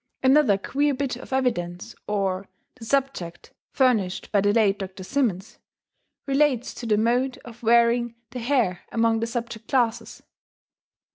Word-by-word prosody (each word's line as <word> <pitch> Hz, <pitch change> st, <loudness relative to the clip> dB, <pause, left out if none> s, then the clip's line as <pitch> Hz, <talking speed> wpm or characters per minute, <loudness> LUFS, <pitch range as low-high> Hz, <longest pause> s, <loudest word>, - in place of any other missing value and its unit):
Another 265 Hz, -6 st, +5 dB
queer 285 Hz, +7 st, 0 dB
bit 270 Hz, -2 st, -2 dB
of 250 Hz, -, -11 dB
evidence 220 Hz, -6 st, -1 dB
or, 195 Hz, -2 st, -1 dB, 0.3 s
the 235 Hz, -3 st, -12 dB
subject, 260 Hz, -10 st, -2 dB, 0.2 s
furnished 220 Hz, -9 st, +1 dB
by 205 Hz, -, +3 dB
the 205 Hz, +1 st, +3 dB
late 205 Hz, -2 st, +2 dB
Dr. 190 Hz, -1 st, -7 dB
Simmons, 215 Hz, -5 st, -2 dB, 0.7 s
relates 275 Hz, -3 st, +1 dB
to 235 Hz, -, -7 dB
the 210 Hz, -1 st, +3 dB
mode 245 Hz, +4 st, +1 dB
of 235 Hz, 0 st, -12 dB
wearing 235 Hz, 0 st, +3 dB, 0.2 s
the 250 Hz, -, -5 dB
hair 235 Hz, -8 st, 0 dB
among 230 Hz, -1 st, +2 dB
the 230 Hz, -, -1 dB
subject 230 Hz, -2 st, -5 dB
classes. 240 Hz, -4 st, -1 dB
230 Hz, 140 wpm, -24 LUFS, 205-255 Hz, 0.7 s, Another